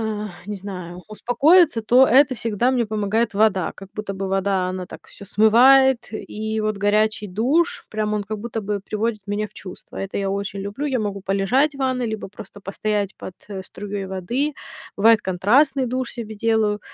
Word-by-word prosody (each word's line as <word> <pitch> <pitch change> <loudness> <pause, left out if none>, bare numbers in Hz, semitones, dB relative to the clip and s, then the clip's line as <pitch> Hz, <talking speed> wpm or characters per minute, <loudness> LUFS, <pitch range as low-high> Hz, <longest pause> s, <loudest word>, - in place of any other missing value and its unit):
а, 215 -1 -3 0.2
не 210 - -4
знаю, 180 -2 -8
успокоиться, 260 - +3
то 255 +4 +5
это 260 +2 +5
всегда 230 +2 0
мне 245 -3 +1
помогает 215 +1 -1
вода. 200 -4 +2
Как 195 0 -12
будто 205 -2 -5
бы 190 0 -4
вода, 195 -1 0
она 185 0 -5
так, - - -12
всё 200 - -12
смывает. 245 +5 +5
И 220 0 -4
вот 215 -1 -1
горячий 210 +1 +1
душ, 265 - 0
прям 215 0 -1
он, 210 - -1
как 215 +1 -5
будто 225 0 -4
бы, 205 0 -2
приводит 215 +1 -3
меня 205 +1 -2
в - - -30
чувства. 185 -2 -11
Это 195 0 -4
я 195 -1 -1
очень 200 0 -3
люблю. 205 +9 -4
Я 260 -4 0
могу 200 -2 -3
полежать 215 +10 +1
в - - -11
ванной, 255 -2 0
либо 220 -2 -5
просто 205 +1 -12
постоять 205 +1 -2
под, 185 - -9
э, 195 -2 -6
струей 200 0 -6
воды. 235 +11 -2 0.4
Бывает 220 +2 +5
контрастный 250 +9 +2
душ 255 +1 -3
себе 220 -3 -7
делаю. 215 -1 +1
215 Hz, 185 wpm, -22 LUFS, 200-235 Hz, 0.4 s, то